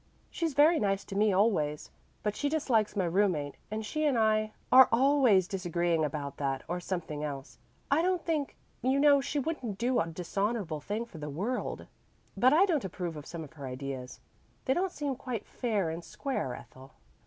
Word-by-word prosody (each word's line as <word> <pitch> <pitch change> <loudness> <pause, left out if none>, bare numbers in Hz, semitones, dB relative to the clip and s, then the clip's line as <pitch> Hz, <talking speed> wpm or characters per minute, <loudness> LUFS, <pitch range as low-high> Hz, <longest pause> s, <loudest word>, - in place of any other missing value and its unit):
She's 325 -5 -2
very 310 +3 +6
nice 195 -1 0
to 195 - -7
me 210 +1 +3
always, 185 -7 +1 0.3
but 210 0 -1
she 285 - -1
dislikes 245 -9 +1
my 190 -3 +1
roommate 170 -5 +1 0.2
and 215 +1 -4
she 305 +8 -2
and 280 -5 +2
I 215 -1 +2 0.2
are 260 0 +9
always 245 -7 +4
disagreeing 175 -4 0
about 145 -1 -3
that 135 -2 -2
or 175 +1 -2
something 170 -5 -4
else. 140 -2 -6 0.3
I 290 +3 +4
don't 365 -1 0
think 310 -4 -1 0.3
you 260 +2 +2
know 285 -1 +6
she 285 - -3
wouldn't 260 -8 -2
do 245 +3 +1
a 165 - 0
dishonorable 180 +1 -2
thing 210 +9 -3
for 175 -9 -12
the 150 0 -5
world, 200 - -3 0.5
but 255 +2 +5
I 335 +7 +6
don't 320 -9 0
approve 180 -3 -4
of 150 -1 -9
some 165 -1 -6
of 150 - -12
her 140 -4 -7
ideas; 130 0 -6 0.5
they 260 - +3
don't 370 +3 0
seem 285 -5 -3
quite 245 -3 -5
fair 205 -9 -1
and 165 +1 -6
square, 215 - -3
Ethel." 130 +1 -13
205 Hz, 190 wpm, -30 LUFS, 160-260 Hz, 0.5 s, are